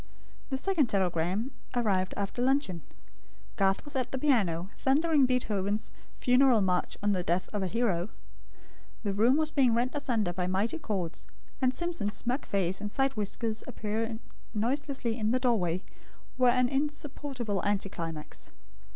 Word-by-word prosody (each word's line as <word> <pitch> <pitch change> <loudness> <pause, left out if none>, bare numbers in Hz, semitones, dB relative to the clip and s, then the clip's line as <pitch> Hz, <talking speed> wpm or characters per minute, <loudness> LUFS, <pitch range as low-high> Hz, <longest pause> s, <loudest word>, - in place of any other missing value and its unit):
The 265 - -1
second 320 -2 +2
telegram 190 - 0 0.2
arrived 195 -6 +1
after 200 +4 -2
luncheon. 260 - +1 0.7
Garth 195 +4 +2
was 290 - -7
at 255 -2 -1
the 265 - -1
piano, 200 - +1
thundering 290 0 +3
Beethoven's 215 -4 0 0.3
Funeral 250 -2 +5
March 180 -2 +1
on 205 - +3
the 185 -2 +1
Death 175 +2 0
of 205 - -1
a 190 - 0
Hero. 200 -4 0 0.9
The 200 -2 0
room 235 +7 +4
was 310 0 +1
being 255 -6 +4
rent 245 +2 +1
asunder 235 -11 0
by 180 0 -1
mighty 200 - 0
chords; 185 - -3 0.3
and 255 -1 +4
Simpson's 330 -9 -2
smug 245 +6 -1
face 190 -1 0
and 210 - -3
side 270 +5 +1
whiskers 215 +1 -2
appearing 220 +1 -3 0.3
noiselessly 250 +1 -1
in 215 0 +1
the 255 +3 +2
doorway, 190 -8 +1 0.5
were 250 -1 +5
an 250 0 +4
insupportable 275 -6 -2
anticlimax. 170 -6 -3
225 Hz, 145 wpm, -30 LUFS, 195-265 Hz, 0.9 s, Funeral